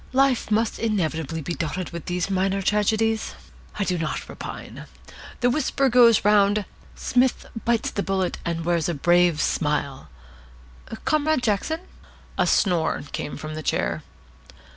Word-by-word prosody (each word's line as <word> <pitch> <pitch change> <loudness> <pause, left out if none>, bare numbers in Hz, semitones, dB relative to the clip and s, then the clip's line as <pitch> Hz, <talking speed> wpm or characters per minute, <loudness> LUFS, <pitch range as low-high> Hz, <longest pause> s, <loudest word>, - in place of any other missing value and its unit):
Life 265 -3 +2
must 220 +1 +1
inevitably 165 -7 -1
be 170 - -3
dotted 170 +3 -3
with 170 -2 -7
these 180 0 -1
minor 195 +1 0
tragedies. 220 +2 +1 0.4
I 205 - +1
do 180 -3 -1
not 160 -2 -3
repine. - - -8 0.5
The 245 0 +3
whisper 275 -1 +1
goes 235 -4 +6
round, 205 0 +4 0.3
'Psmith 250 +1 +1 0.2
bites 235 -1 +1
the 200 - -2
bullet, 190 -2 -1
and 165 -1 -3
wears 170 -1 +1
a 170 - -1
brave 175 +1 +3
smile.' 145 -3 -1 1.0
Comrade 310 -3 +2
Jackson 245 - 0 0.3
" - - -25
A - - +3
snore 175 -5 +2
came 145 - -4
from 155 +1 -6
the 155 - -5
chair. - - -1
195 Hz, 140 wpm, -24 LUFS, 170-225 Hz, 1.0 s, goes